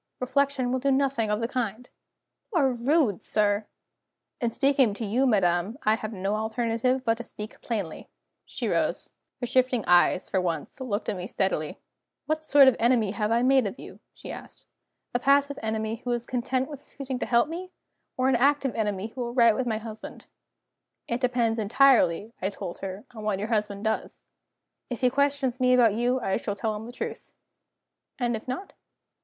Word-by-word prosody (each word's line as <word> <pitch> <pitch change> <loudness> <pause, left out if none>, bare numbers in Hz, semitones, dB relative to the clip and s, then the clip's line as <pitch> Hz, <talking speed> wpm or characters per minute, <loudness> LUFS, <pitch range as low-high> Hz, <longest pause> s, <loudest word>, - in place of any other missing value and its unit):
"Reflection 260 0 0
will 260 - 0
do 275 +2 0
nothing 265 -5 +1
of 210 +1 0
the 230 - 0
kind." 245 -1 -3 0.6
"You 375 - 0
are 270 -3 +3
rude, 250 - +1
sir!" 210 0 +1 0.7
"In 240 -4 0
speaking 265 -3 +2
to 225 - -4
you, 245 +6 +2
madam, 190 0 +2
I 215 - +4
have 220 0 -3
no 195 0 -2
alternative 230 +3 0
but 225 -1 +2
to 235 - -6
speak 215 -1 -9
plainly." 205 -9 -4 0.3
She - - -4
rose. - - -1 0.3
Her - - 0
shifting 250 -2 +2
eyes, 175 +1 +4
for 190 - 0
once, 170 - -3
looked 225 -4 -3
at - - -1
me 180 0 -5
steadily. 190 -8 -1 0.5
"What 310 0 -1
sort 290 -3 +6
of 260 - +6
enemy 230 -4 +3
have 210 +1 -1
I 235 +1 +3
made 260 -3 +4
of 200 - -6
you?" - - -11 0.2
she - - -9
asked. - - -11 0.5
"A 245 - +1
passive 280 +1 +3
enemy 220 0 -2
who 250 - -4
is 240 0 -3
content 255 +1 -1
with 290 -3 -9
refusing 270 -3 -6
to - - -3
help 235 +3 +3
me? 350 +3 -6 0.5
Or 255 0 +2
an 265 - +3
active 275 +1 +2
enemy 210 -1 -2
who 250 - -7
will 240 0 -4
write 235 -3 +5
to 250 -2 -1
my 220 - 0
husband?" 220 0 -9 0.8
"It 235 +2 -2
depends 240 -3 +1
entirely," 225 -3 +3
I 190 - 0
told 195 -3 -7
her, 195 +1 -6
"on 215 -2 -8
what 210 -2 0
your 210 +3 -4
husband 210 -2 -1
does. 220 0 -2 0.7
If 245 -1 -5
he 250 -1 +3
questions 280 -2 +1
me 255 0 +4
about 235 -4 +5
you, 245 +3 +1
I 195 -5 0
shall 205 -3 -3
tell 215 +1 -2
him 215 +2 -7
the - - -8
truth." - - -7 0.8
"And 240 -2 0
if 220 - -8
not?" 260 +10 -5
235 Hz, 190 wpm, -26 LUFS, 210-260 Hz, 0.8 s, sort